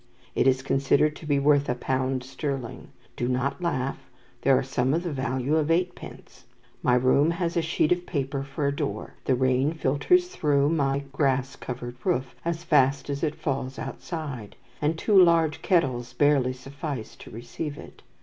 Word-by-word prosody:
It - - +2
is 130 0 +3
considered 140 +3 +2
to 155 - -10
be 145 -1 +2
worth 145 0 +3
a 125 - +1
pound 130 0 -1
sterling. 135 -2 -5 0.3
Do 120 - -2
not 130 +6 -1
laugh; 135 -6 -2 0.3
there 135 -1 +4
are - - 0
some 130 +1 0
of 170 - -1
the 175 - -3
value 130 +1 0
of 155 -1 0
eightpence. 175 +2 -3 0.4
My 125 - +3
room 130 +5 +4
has 170 0 -1
a 170 - +3
sheet 160 0 0
of 180 0 +1
paper 140 -3 -2
for 140 +1 -4
a 140 0 0
door, 145 -1 -4
the 130 - +3
rain 130 +3 +2
filters 160 - +2
through 145 - +2
my 140 -3 +1
grass 135 -2 0
covered 120 -1 -7
roof 130 0 0
as 170 0 -2
fast 140 -3 +2
as 140 0 -3
it 155 -2 -1
falls 135 -2 -3
outside, 135 - -6 0.3
and 155 +2 +1
two 200 +1 +5
large 165 -3 +3
kettles 130 -9 +1
barely 140 -3 +3
suffice 135 -1 -6
to - - -12
receive 145 +6 -6
it. - - -12
140 Hz, 175 wpm, -26 LUFS, 130-155 Hz, 0.4 s, two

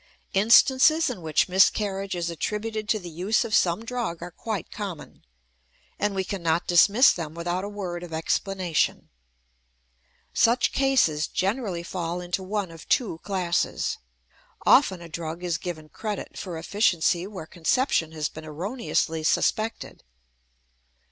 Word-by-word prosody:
Instances 260 +9 +5
in 205 -8 -7
which 155 -2 +1
miscarriage 195 +1 +2
is 170 -1 -2
attributed 215 +4 -3
to 220 - +3
the 180 -4 -8
use 190 +9 0
of 220 - -5
some 180 +5 +2
drug 230 -8 -3
are 175 - -7
quite 215 +3 -5
common, 195 -7 -7 0.8
and 205 -1 0
we 190 - 0
cannot 170 -3 -1
dismiss 205 +9 +6
them 160 -2 -6
without 175 +2 -2
a 200 - -4
word 185 -4 -5
of 175 -1 -9
explanation. 175 +1 -1 1.2
Such 240 +2 +3
cases 255 - +2
generally 195 -3 -2
fall 170 0 -3
into 180 +1 -3
one 195 -1 -3
of 165 -1 -13
two 205 -10 +1
classes. 180 -3 -1 0.7
Often 185 -2 +5
a - - -9
drug 165 +1 -6
is 170 -3 -1
given 160 -4 -6
credit 210 +5 -5
for 175 -4 -6
efficiency 175 -1 +1
where 195 -6 -8
conception 165 - 0
has 155 -1 -2
been 155 - -10
erroneously 165 - -2
suspected. 220 +7 -1
185 Hz, 135 wpm, -25 LUFS, 170-210 Hz, 1.2 s, dismiss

